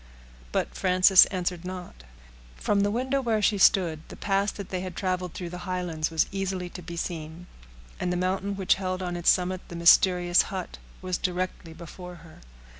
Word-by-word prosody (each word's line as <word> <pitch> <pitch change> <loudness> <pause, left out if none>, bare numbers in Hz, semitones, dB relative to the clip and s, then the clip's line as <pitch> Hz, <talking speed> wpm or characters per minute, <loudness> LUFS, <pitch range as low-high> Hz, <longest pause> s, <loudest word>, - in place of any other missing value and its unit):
But - - -1
Frances 185 0 +6
answered 180 -2 -3
not. 180 -1 -7 0.6
From 200 - 0
the 205 - +2
window 260 +5 0
where 230 -4 0
she 205 -1 +2
stood, 170 -5 +4
the - - -10
pass 200 0 0
that 200 -3 -8
they 185 -1 -3
had 185 -2 -6
traveled 185 -2 -2
through 175 -2 -6
the 180 - -7
Highlands 175 -4 -2
was 160 -1 +2
easily 190 -2 -3
to 180 - -9
be 170 0 -8
seen; 165 0 -5 0.5
and 180 - -1
the 180 - -1
mountain 190 +2 -1
which 190 -1 +2
held 185 0 -2
on 175 -1 -3
its 175 -1 +2
summit 185 0 +2
the 170 - -9
mysterious 175 +1 +5
hut 190 -4 -6 0.2
was 185 -1 -2
directly 180 -2 -3
before 180 +2 -10
her. 160 - -15
180 Hz, 185 wpm, -26 LUFS, 175-190 Hz, 0.6 s, Frances